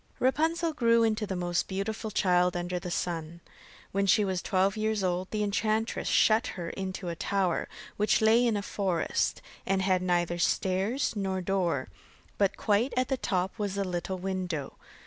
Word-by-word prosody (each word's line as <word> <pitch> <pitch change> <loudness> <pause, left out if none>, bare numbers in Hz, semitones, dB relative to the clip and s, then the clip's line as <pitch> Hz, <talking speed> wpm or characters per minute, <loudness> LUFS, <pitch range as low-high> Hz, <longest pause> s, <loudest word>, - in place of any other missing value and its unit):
Rapunzel 320 +5 +1
grew 230 -4 +3
into 215 -1 +1
the 190 - -3
most 175 -1 -1
beautiful 205 +3 -3
child 180 -3 +2
under 175 +1 -2
the 180 0 -6
sun. 170 -1 -3 0.5
When 200 +1 0
she 205 +2 +4
was 185 -2 -1
twelve 190 0 +1
years 215 -1 0
old, 185 0 -1
the 215 -1 -1
enchantress 215 +2 0
shut 220 +2 +4
her 170 -2 -4
into 190 -1 -4
a 170 - -3
tower, 190 0 0 0.3
which 210 +1 +3
lay 220 +2 +5
in 220 -3 +1
a 200 - -3
forest, 190 -5 -1 0.2
and 190 0 0
had 185 -1 +2
neither 175 -1 0
stairs 195 +10 +1
nor 190 -2 -1
door, 180 -7 0 0.5
but 200 -1 +2
quite 220 +5 +1
at 255 0 +1
the 265 - +2
top 185 -4 -1
was 200 -1 -2
a 200 - +1
little 185 0 -3
window. 180 -6 -3
195 Hz, 170 wpm, -29 LUFS, 180-215 Hz, 0.5 s, lay